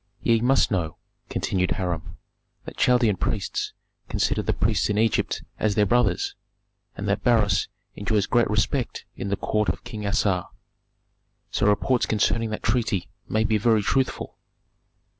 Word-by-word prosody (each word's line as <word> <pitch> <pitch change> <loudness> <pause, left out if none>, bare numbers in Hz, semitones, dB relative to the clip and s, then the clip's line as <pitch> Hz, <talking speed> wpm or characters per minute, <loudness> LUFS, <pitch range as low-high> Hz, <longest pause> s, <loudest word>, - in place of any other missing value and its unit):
"Ye 115 -1 +3
must 130 0 +3
know," 85 -6 -1 0.3
continued 90 -1 0
Hiram, 90 -5 -4 0.5
"that - - -8
Chaldean 120 -5 +3
priests 100 +1 -2 0.4
consider - - +1
the - - 0
priests - - +1
in 105 - 0
Egypt 110 0 +1 0.2
as 105 -2 +1
their 105 - +4
brothers, 105 -3 +1 0.6
and 100 - -4
that 100 - 0
Beroes 110 -6 +3 0.3
enjoys 105 -1 0
great 120 -3 +2
esteem 110 +5 +1 0.3
in - - -5
the 100 - +1
Court 105 +1 0
of - - -3
King 105 -2 -5
Assar, 100 -4 +1 1.0
so - - +1
reports 115 +4 +2
concerning 110 +1 +1
that 110 - -5
treaty 105 -8 0 0.2
may 110 0 +2
be 110 -1 +2
very 110 -1 +3
truthful." 130 +4 -1
105 Hz, 145 wpm, -25 LUFS, 100-115 Hz, 1.0 s, their